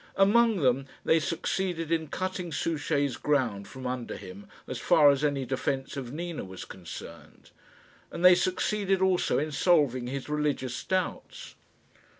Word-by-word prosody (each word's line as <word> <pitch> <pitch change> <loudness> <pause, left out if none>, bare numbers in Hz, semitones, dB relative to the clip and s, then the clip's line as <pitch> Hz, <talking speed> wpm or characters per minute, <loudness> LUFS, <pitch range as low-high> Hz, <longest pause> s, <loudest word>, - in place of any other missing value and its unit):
Among 215 0 +4
them 135 0 +2 0.2
they 160 - +4
succeeded 165 0 -2
in 160 -1 0
cutting 185 +1 -4
Souchey's 145 -4 -1
ground 120 -9 0
from 130 0 -9
under 125 -1 -4
him 100 +1 -11 0.2
as - - -5
far 145 -2 +6
as 140 +1 -1
any 140 -3 0
defence 135 +1 -2
of 130 -3 -5
Nina 170 +2 -5
was 95 -1 -8
concerned, 90 -4 -11 0.6
and 175 - -2
they 180 - +10
succeeded 190 +2 +1
also 190 -1 +2
in 155 +2 -1
solving 140 -6 +2
his 135 +1 -5
religious 150 -4 -2
doubts. 185 -1 -3
150 Hz, 145 wpm, -28 LUFS, 130-180 Hz, 0.6 s, they